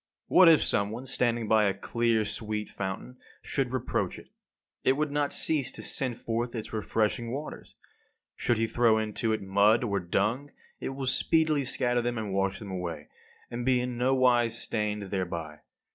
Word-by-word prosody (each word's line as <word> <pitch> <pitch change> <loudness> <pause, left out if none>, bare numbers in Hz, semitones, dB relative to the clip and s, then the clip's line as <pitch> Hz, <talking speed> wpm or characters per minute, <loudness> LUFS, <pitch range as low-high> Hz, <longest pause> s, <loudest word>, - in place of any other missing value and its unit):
What 185 -2 +7
if 160 - +6
some 100 0 +1
one, 120 +5 -6
standing 120 -3 0
by 110 0 +4
a 100 - +1
clear 115 -2 0
sweet 105 0 -3
fountain, 95 +6 -5 0.3
should 135 -3 -1
reproach 130 -2 -2
it? - - -14 0.5
It 130 - +4
would 150 +1 -1
not 145 0 0
cease 150 -5 0
to - - -6
send 125 -4 0
forth 120 +1 -3
its 110 -1 -6
refreshing 110 +1 0
waters. 145 +4 -7 0.6
Should 120 - +1
he 115 - +2
throw 115 -1 +3
into 110 +1 -1
it 110 -2 -1
mud 100 +5 +4
or 100 -4 0
dung, 105 +10 -1 0.3
it - - -4
will 135 -1 -4
speedily 155 +3 +2
scatter 120 0 0
them 120 0 -2
and 105 -3 -3
wash 95 0 0
them 100 -3 -8
away, 85 -5 -5 0.4
and 120 +1 -3
be 130 0 +3
in 125 0 -3
nowise 125 -2 +3
stained 105 -2 -2
thereby. 85 -5 -4
115 Hz, 175 wpm, -28 LUFS, 105-125 Hz, 0.6 s, What